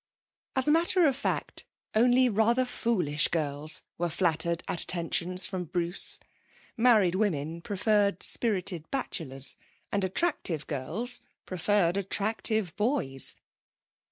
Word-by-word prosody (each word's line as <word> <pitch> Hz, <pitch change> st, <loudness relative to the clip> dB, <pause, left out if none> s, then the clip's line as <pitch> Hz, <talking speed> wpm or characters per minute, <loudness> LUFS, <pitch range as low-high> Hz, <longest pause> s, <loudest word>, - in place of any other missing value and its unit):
As 265 Hz, +1 st, +3 dB
a -, -, +4 dB
matter 340 Hz, +2 st, +3 dB
of 275 Hz, -4 st, +2 dB
fact, 280 Hz, -, -3 dB, 0.3 s
only 245 Hz, +3 st, +4 dB
rather 235 Hz, +3 st, +2 dB
foolish 180 Hz, -12 st, 0 dB
girls 150 Hz, -1 st, 0 dB, 0.2 s
were 175 Hz, 0 st, 0 dB
flattered 170 Hz, 0 st, 0 dB
at 175 Hz, -, 0 dB
attentions 175 Hz, +1 st, +1 dB
from 185 Hz, -2 st, -4 dB
Bruce. 175 Hz, +2 st, -1 dB, 0.6 s
Married 225 Hz, -7 st, +4 dB
women 170 Hz, -5 st, -2 dB
preferred 200 Hz, 0 st, 0 dB
spirited 185 Hz, -7 st, 0 dB
bachelors, 145 Hz, -, +1 dB, 0.4 s
and 200 Hz, -1 st, -1 dB
attractive 190 Hz, -, -1 dB
girls 215 Hz, -, -1 dB, 0.2 s
preferred 185 Hz, 0 st, +1 dB
attractive 205 Hz, -1 st, 0 dB
boys. 210 Hz, -, 0 dB
190 Hz, 110 wpm, -28 LUFS, 170-230 Hz, 0.6 s, a